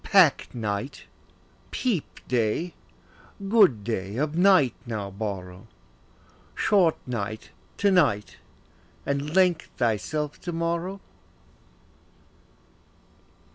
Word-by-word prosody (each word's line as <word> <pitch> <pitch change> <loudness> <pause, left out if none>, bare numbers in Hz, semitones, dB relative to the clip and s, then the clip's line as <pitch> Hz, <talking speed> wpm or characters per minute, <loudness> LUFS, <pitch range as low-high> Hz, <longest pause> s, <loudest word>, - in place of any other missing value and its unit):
Pack 185 -8 +5
night, 110 +3 -4 0.7
peep 225 - -3
day; 125 +8 0 0.8
good 195 - +5
day, 100 -1 -3
of 150 +3 -1
night 180 -8 +5
now 105 -4 -4
borrow: 95 -1 -6 0.9
Short, 180 -6 +3
night, 110 -3 -4 0.3
to 200 -1 +3
night, 140 - +2 0.7
and 140 +3 -2
length 180 -3 +3
thyself 130 +6 -1
to 175 - -4
morrow. 170 +3 -2
140 Hz, 85 wpm, -26 LUFS, 110-175 Hz, 0.9 s, Pack